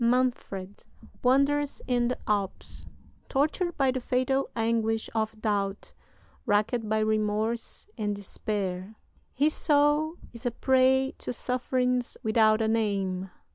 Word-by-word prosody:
Manfred 235 -6 0 0.4
wanders 280 +3 +2
in 245 -1 +1
the 250 - -1
Alps. 200 -2 -2 0.4
Tortured 315 +5 0
by 270 -2 +3
the 260 - -2
fatal 255 +2 0
anguish 225 -1 0
of 220 -1 -2
doubt, 200 -2 -2 0.5
racked 215 +2 +1
by 220 - +2
remorse 215 +1 -1
and 210 -1 -1
despair, 200 -1 -4 0.4
his 295 +4 +3
soul 295 +2 +2 0.2
is 235 0 -10
a 245 - +1
prey 265 +2 +3
to - - -4
sufferings 250 0 -1
without 220 0 +4
a - - +1
name. 195 -4 0
230 Hz, 120 wpm, -28 LUFS, 215-260 Hz, 0.5 s, without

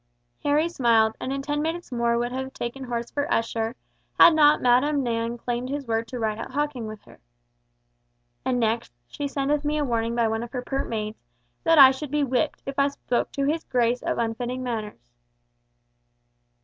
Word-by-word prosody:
Harry 295 +3 +2
smiled, 230 -8 +3
and 260 - -3
in 275 0 -3
ten 295 +1 -1
minutes 330 +1 -3
more 235 -1 +1
would 240 +1 -1
have 265 +1 -4
taken 250 +3 -5
horse 235 -1 -4
for 285 0 -2
Esher, 225 +1 0 0.4
had 340 - +9
not 300 -1 +5
Madam 270 +4 +3
Nan 230 0 -2
claimed 245 +1 -3
his 285 0 -3
word 225 0 -1
to 250 - -6
ride 220 -2 -2
out 255 - -7
hawking 285 -5 -2
with 215 -1 -9
her. - - -18 1.2
And 255 -1 0
next, 230 0 0
she 285 - -5
sendeth 285 +1 -1
me 300 +1 0
a 295 - 0
warning 230 -2 -1
by 235 -1 +2
one 225 0 -1
of 240 +2 -8
her 250 -1 -3
pert 270 +2 -3
maids, 215 -1 -4 0.4
that 330 0 +4
I 270 -2 +10
should 270 +2 -6
be 295 +1 +1
whipped, 265 +3 -1
if 275 0 -4
I 275 - +4
spoke 265 -3 -2
to 275 - -1
his 315 +3 0
Grace 245 -1 +1
of - - -2
unfitting 240 +2 -2
matters. 210 - -5
250 Hz, 190 wpm, -25 LUFS, 230-285 Hz, 1.2 s, I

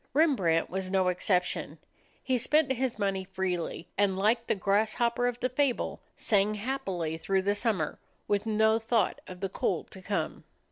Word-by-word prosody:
Rembrandt 200 - +3
was 190 0 -3
no 190 -1 +2
exception. 180 0 0 0.5
He 260 - +1
spent 285 +4 +3
his 260 -2 -1
money 195 -2 0
freely, 185 -3 -3
and 195 -2 +3
like 225 +4 +2
the - - +2
grasshopper 220 +5 +1
of 245 0 -2
the 255 - +2
fable, 260 -1 0 0.2
sang 210 -1 +2
happily 195 -9 -3
through 190 +3 0
the 200 +1 +2
summer, 205 -7 -1 0.3
with 205 +1 0
no 220 +1 +3
thought 225 0 0
of 180 0 -9
the 195 - -1
cold 180 -2 -2
to 190 - -8
come. 200 +2 -3
205 Hz, 160 wpm, -29 LUFS, 185-235 Hz, 0.5 s, Rembrandt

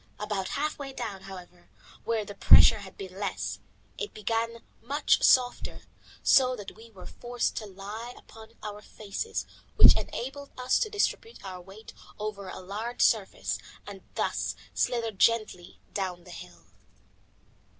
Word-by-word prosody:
About 205 -3 -2
half 300 +1 -1
way 275 -1 -5
down, 195 -6 -5
however, 180 -2 -11 0.4
where 225 -2 0
the 205 - -7
pressure 215 +2 +8
had 195 -2 -11
been 190 -1 -8
less, 200 -3 -2 0.4
it 430 - -4
became 230 +2 -1 0.2
much 285 +5 +2
softer, 250 -2 +3 0.4
so 255 -1 +5
that 205 -4 -9
we 225 +2 -14
were 195 -5 -12
forced 245 0 -2
to 215 - -4
lie 205 +5 -7
upon 225 0 -14
our 210 0 -6
faces, 215 - -4 0.3
which - - +9
enabled 280 +3 -4
us 250 0 +2
to 435 - 0
distribute 430 - -1
our 185 -1 -6
weight 195 +4 -12 0.2
over 210 -2 -5
a - - -7
larger 215 +6 -5
surface, 215 -4 +1 0.3
and 200 -2 -9
thus - - -1 0.2
slither 235 -2 0
gently 210 -4 +1
down 185 -3 -3
the 180 - -12
hill. 180 +1 -11
215 Hz, 145 wpm, -29 LUFS, 195-240 Hz, 0.4 s, which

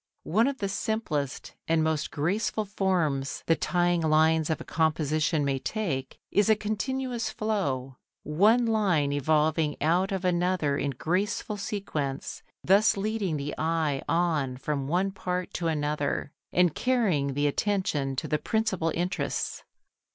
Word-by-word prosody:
One 220 +9 +2
of 280 -1 -2
the 200 - -2
simplest 195 - -2
and 160 -1 +3
most 155 -2 0
graceful 195 +8 -1
forms 170 -9 -1
the 165 - +4
tying 175 +2 +1
lines 160 0 +3
of 160 - 0
a - - -6
composition 155 -1 +1
may 135 -1 0
take 140 -8 -3
is 205 +1 +3
a 220 - +6
continuous 235 +3 -2
flow, 140 -13 -2 0.3
one 210 +11 +4
line 190 -11 +2
evolving 150 +1 +1
out 175 +6 +2
of 190 -1 -2
another 175 -4 +1
in 140 0 -1
graceful 185 - -1
sequence, 175 - -4 0.2
thus 200 +3 +4
leading 200 -5 -1
the 145 +1 -4
eye 160 -3 0
on 155 -6 +1
from 140 0 -2
one 185 +5 +1
part 180 -1 -3
to 170 - -2
another 145 -2 -1 0.2
and 180 -3 +3
carrying 185 - +1
the 145 +1 +1
attention 145 -4 0
to - - -3
the 150 - 0
principal 215 -7 0
interests. 180 +4 -2
165 Hz, 140 wpm, -27 LUFS, 145-200 Hz, 0.3 s, a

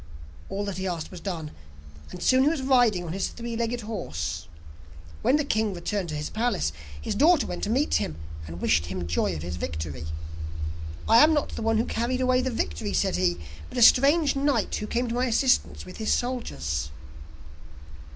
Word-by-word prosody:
All 200 +1 -2
that 195 -2 -4
he 190 - -2
asked 170 -3 -4
was 180 - -8
done, 165 -5 -4 0.6
and 180 - -7
soon 255 0 +5
he 290 - +5
was 310 -4 -2
riding 245 -8 +4
on 165 -1 -5
his 195 - -1
three 235 -1 -6
legged 235 +1 -1
horse. 80 - -4 0.7
When 270 - +4
the 295 -1 +1
king 215 -6 0
returned 180 +1 -2
to 155 - -3
his 150 0 -4
palace, 215 - 0 0.3
his 75 - -3
daughter 315 +3 +4
went - - -5
to - - -4
meet 270 +6 +1
him, 75 - +1 0.3
and 85 +2 -7
wished 80 -1 +2
him 90 -1 -4
joy 85 +2 0
of 75 - -5
his 85 0 -4
victory. 80 -2 -4 1.0
'I 225 - +6
am 315 +1 +5
not 295 - 0
the - - -6
one 225 0 +2
who 225 - +2
carried 240 +3 -1
away 255 0 +3
the 260 - -1
victory,' 80 - -2
said - - +1
he, 90 -1 +1 0.3
'but - - -8
a 240 - +5
strange 285 +6 +6
knight 275 -5 +1
who 210 - -2
came 245 +2 0
to 230 - -2
my 250 +2 +1
assistance 250 +2 +2
with 185 - -10
his 220 - -1
soldiers. 75 - -1
210 Hz, 200 wpm, -26 LUFS, -, 1.0 s, I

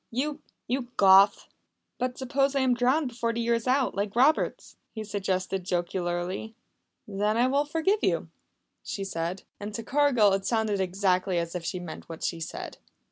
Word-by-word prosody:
You 290 +5 -2 0.2
you 250 +1 -2
Goth!" 195 +1 +6 0.5
"But 250 0 -2
suppose 275 +1 0
I 275 - +2
am 260 -1 +3
drowned 255 +4 +2
before 235 -1 -2
the 230 - -3
year 235 0 +1
is 230 +1 -1
out 260 0 +2
like 200 +1 -3
Roberts?" 275 +6 +2 0.2
he 220 - -4
suggested 190 -2 -2
jocularly. 175 +3 -2 0.5
"Then 210 +2 0
I 240 - +4
will 280 +3 +2
forgive 325 +8 +1
you," - - 0 0.5
she 195 - -5
said. 175 0 -3 0.2
And 205 +1 -6
to 230 - -4
Cargill 250 -6 +3
it 195 0 0
sounded 220 -4 +1
exactly 185 0 +1
as 170 0 -2
if 180 -2 -4
she 180 - -3
meant 175 -2 -9
what 165 - -8
she 170 - -1
said. 160 - -7
215 Hz, 175 wpm, -27 LUFS, 190-255 Hz, 0.5 s, Goth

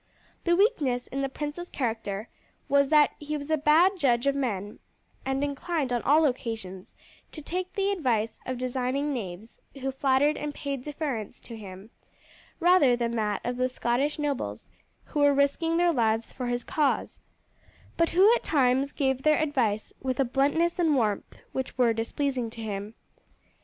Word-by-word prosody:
The 345 0 +4
weakness 300 - +2
in 275 - -4
the 275 - -1
prince's 300 +5 -5
character 220 -4 -3 0.4
was 280 0 +4
that 300 -1 +5
he 300 0 -3
was 285 +2 -6
a - - +5
bad 330 +6 +4
judge 245 -5 +2
of 280 - +3
men, 210 -7 -3 0.5
and 270 +1 0
inclined 285 -1 -2
on 240 - 0
all 305 +3 +4
occasions 225 -8 -4 0.4
to - - -8
take 365 +4 -4
the 395 0 +1
advice 235 - 0
of 255 -1 -2
designing 255 +3 -1
knaves 205 -2 -7 0.2
who 270 0 -2
flattered 270 +2 +2
and 295 0 -4
paid 275 -3 -4
deference 280 -7 -4
to 230 - -9
him, 200 0 -10 0.7
rather 345 -8 +5
than 235 -1 -1
that 210 -2 -1
of 245 +1 -2
the 255 0 +1
Scottish 255 +4 0
nobles 290 -3 -3 0.3
who 295 - -4
were 285 -1 +5
risking 305 +4 +2
their 345 0 +3
lives 225 -3 0
for 250 -2 -4
his 245 0 -1
cause, 295 -3 0 0.8
but 335 0 +2
who 390 +6 +6
at 485 - 0
times 270 -1 +2
gave 265 -2 0
their 305 +2 +4
advice 250 -9 0
with 260 -1 -2
a 270 - +4
bluntness 290 +8 +1
and 320 -4 +3
warmth 215 -6 -1
which 265 -1 -4
were 240 -3 +4
displeasing 245 +2 -2
to 225 0 -9
him. 205 +1 -5
270 Hz, 170 wpm, -27 LUFS, 235-300 Hz, 0.8 s, who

